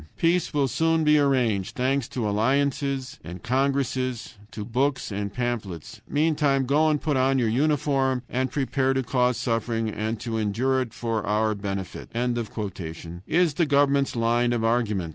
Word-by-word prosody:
"Peace 170 +1 +2
will 145 -2 +1
soon 165 +5 +1
be 150 0 +5
arranged, 115 -8 +1
thanks 130 +1 0
to 125 -6 -3
alliances 135 +4 0
and 85 +2 -9
congresses, 130 -1 -1 0.2
to 105 -3 -6
books 130 +2 -1
and 100 0 -3
pamphlets; 110 -10 -4
meantime 145 -3 +2
go 150 +4 +3
and 150 -1 +1
put 150 -2 -1
on 135 +1 +2
your 120 -3 +2
uniform, 135 0 +1
and 130 +1 -1
prepare 135 0 0
to 130 - +1
cause 125 0 +1
suffering 115 -1 -1
and 110 +1 -3
to 115 -1 -3
endure 125 +6 +1
it 120 -3 -4
for 115 -2 -2
our 110 +1 +2
benefit," 100 -2 -5 1.2
is 170 -2 +2
the 170 +3 +2
government's 140 -1 +2
line 120 +1 +2
of 115 -2 -1
argument. 110 -7 0
130 Hz, 155 wpm, -25 LUFS, 115-140 Hz, 1.2 s, be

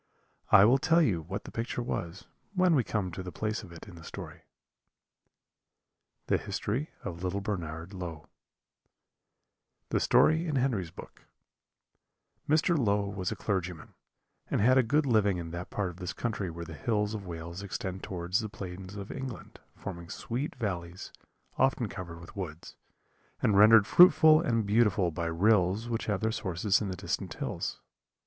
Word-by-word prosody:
I 95 - +9
will 130 +5 +5
tell 165 +4 +4
you 95 - +1
what 95 +5 -5
the - - -10
picture 120 +1 -3
was 85 -4 -4 0.3
when 185 -2 +4
we 135 -6 +3
come 100 -5 -2
to 90 - -6
the 90 -1 -7
place 110 +6 -2
of 100 -6 -12
it 85 +4 -11
in 100 - -11
the 85 -1 -12
story. - - -9 1.8
The - - +1
History 130 +10 -3
of 85 +1 -6
Little 95 +2 -1
Bernard 85 -3 -5
Low 85 -5 -6 1.6
THE - - +1
STORY 160 +2 +4
IN 150 - -1
HENRY'S 125 -10 0
BOOK - - -13 1.2
"Mr. 160 +3 +3
Low 105 -7 +1
was 95 -2 -3
a - - -2
clergyman, 90 -5 -3 0.6
and - - 0
had 125 +5 +5
a 130 - +6
good 145 +6 +2
living 105 -6 +3
in 85 -1 -6
that 85 +1 -6
part 100 -4 -2
of 85 - -15
this 90 -2 -5
country 105 -5 -3
where 85 0 -7
the 80 - -9
hills 105 +7 -1
of 100 -3 -6
Wales 85 +2 -6
extend 95 -1 -5
towards 90 0 -2
the 110 -2 -4
plains 95 -1 -8
of 100 -1 -7
England, 130 -3 -7 0.2
forming 85 -3 -7
sweet 130 +6 -4
valleys, 90 -6 -4 0.5
often 130 -3 +2
covered 90 -4 -7
with 85 - -13
woods, 85 -5 -7 0.7
and 105 - +3
rendered 105 +1 +8
fruitful 160 - +7
and 115 -9 0
beautiful 100 -4 +3
by 85 +1 -3
rills 95 +4 +2
which 115 -2 -3
have 105 -3 0
their 110 0 +1
sources 95 -1 0
in 105 - -2
the 95 - -3
distant - - -3
hills. - - -4
100 Hz, 170 wpm, -30 LUFS, 90-115 Hz, 1.8 s, I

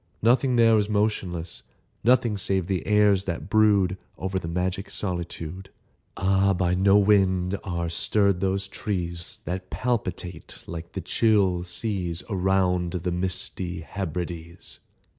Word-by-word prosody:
Nothing 125 +2 +3
there 115 -1 +5
is 105 0 -1
motionless— 95 -5 -1 0.4
Nothing 120 -1 +3
save 95 -2 0
the 95 -1 -2
airs 105 -2 +4
that 85 +2 -4
brood 100 -4 +3 0.2
Over 95 0 -2
the 85 - -6
magic 90 +3 -2
solitude. 90 -1 -4 0.5
Ah, 95 +1 +3
by 90 0 +1
no 95 +2 +4
wind 95 -2 +3
are 85 -2 -2
stirred 100 +3 +1
those 95 +1 -1
trees 90 -4 -4
That 90 +1 -4
palpitate 100 -7 -3
like 85 0 -7
the - - -3
chill 100 -6 +2
seas 90 -2 -3
Around 90 -2 +1
the 90 0 -2
misty 90 -1 -2
Hebrides! 85 -1 -6
95 Hz, 125 wpm, -25 LUFS, 90-100 Hz, 0.5 s, there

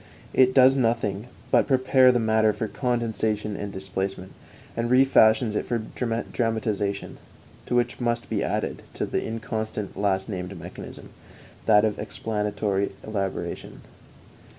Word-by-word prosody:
It 130 0 +4
does 130 0 +7
nothing 115 -4 0 0.2
but - - +4
prepare 130 -1 +5
the 125 - +1
matter 110 -1 +3
for 110 - -3
condensation 110 -4 -1
and 100 0 -5
displacement, 95 0 -4 0.4
and 115 +1 -1
refashions 120 -4 +5
it - - 0
for 120 - 0 0.6
dramatization, 105 -4 -1 0.5
to - - 0
which 120 0 +1
must 120 -1 -1
be - - -1
added - - -2
the - - -2
inconstant 110 -2 -4
last 95 -1 0
named 95 -3 -5
mechanism - - -10 0.6
that 105 -1 +6
of 110 - -1
explanatory 105 -2 -2
elaboration. 100 -3 -4
110 Hz, 125 wpm, -25 LUFS, 100-120 Hz, 0.6 s, does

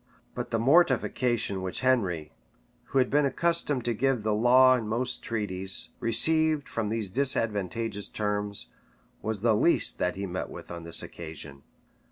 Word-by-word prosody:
But - - -5
the 115 - 0
mortification 120 - +2
which 95 +7 -3
Henry, 95 - 0 0.5
who 135 - -3
had 130 -1 +2
been 145 0 +3
accustomed 150 -3 0
to 120 - +1
give 125 0 0
the 110 0 0
law 130 +4 +5
in 115 -4 -3
most 125 +3 -2
treaties, 95 -4 -2
received 155 +5 +2
from 110 -2 -3
these 110 -3 -2
disadvantageous 110 -4 -1
terms, 105 -1 -3 0.5
was 110 -2 -3
the 115 -1 +3
least 170 +11 +2
that 90 - 0
he 100 +1 -4
met 90 0 -5
with - - -10
on 85 -1 -7
this 85 - +5
occasion. 80 -4 -8
115 Hz, 155 wpm, -27 LUFS, 100-130 Hz, 0.5 s, law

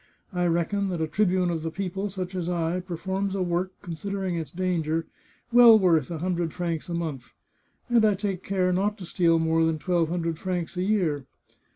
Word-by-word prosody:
I 180 -1 +1
reckon 175 +4 0
that 175 -3 -2
a - - +2
tribune 185 -1 +1
of 165 -2 -2
the 165 - -2
people, 195 +3 -3
such 185 -1 -5
as 180 -2 -2
I, 170 0 0
performs 190 +2 -3
a 190 - 0
work, 175 +1 -1
considering 190 +1 -3
its 165 -2 -4
danger, 165 -3 -1 0.5
well 235 -2 +9
worth 170 -8 +3
a 170 - -4
hundred 170 -1 -1
francs 170 -2 -3
a 170 - -2
month, 155 -7 -5 0.5
and 240 -3 +4
I 210 -2 +4
take 195 -2 -3
care 185 -2 0
not 205 +3 0
to 190 - -8
steal 165 -1 +2
more 165 0 +2
than 160 -1 +1
twelve 170 0 0
hundred 165 -2 -2
francs 180 -2 -3
a 180 - -1
year. 175 -9 0
180 Hz, 195 wpm, -26 LUFS, 165-190 Hz, 0.5 s, well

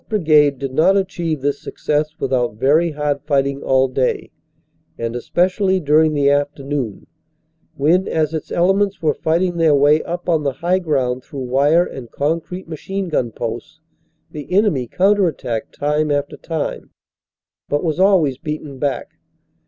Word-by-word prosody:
Brigade 150 -8 +3
did 135 0 -5
not 190 +8 +4
achieve 175 -6 -2
this 140 +1 -1
success 150 +1 -2
without 125 -4 0
very 145 +9 +3
hard 145 -1 -1
fighting 140 -2 0
all 130 0 +2
day, 130 0 -1 0.7
and 115 0 -3
especially 185 - +1
during 155 0 +3
the 140 -1 +2
afternoon, 140 -5 -1 0.7
when 170 +7 +2
as 155 -1 0
its 160 - -5
elements 195 +2 +1
were 150 -2 +3
fighting 170 +2 0
their 160 -3 +4
way 145 +2 +4
up 175 +1 -6
on 165 -3 +2
the 140 -2 -1
high 180 +6 0
ground 130 -7 -1
through 140 0 -8
wire 145 +7 +3
and 125 -8 -9
concrete 165 +7 -3
machine 190 +4 -4
gun 125 -7 -1
posts, 120 +7 -6 0.5
the 150 +2 -8
enemy 185 - +2
counter 195 - +3
attacked 120 -7 -4
time 150 +1 0
after 145 0 -1
time, 160 -3 -4 0.8
but 145 +3 0
was 160 0 -1
always 175 -9 +3
beaten 150 -3 -6
back. 140 -1 -2
150 Hz, 150 wpm, -19 LUFS, 140-170 Hz, 0.8 s, not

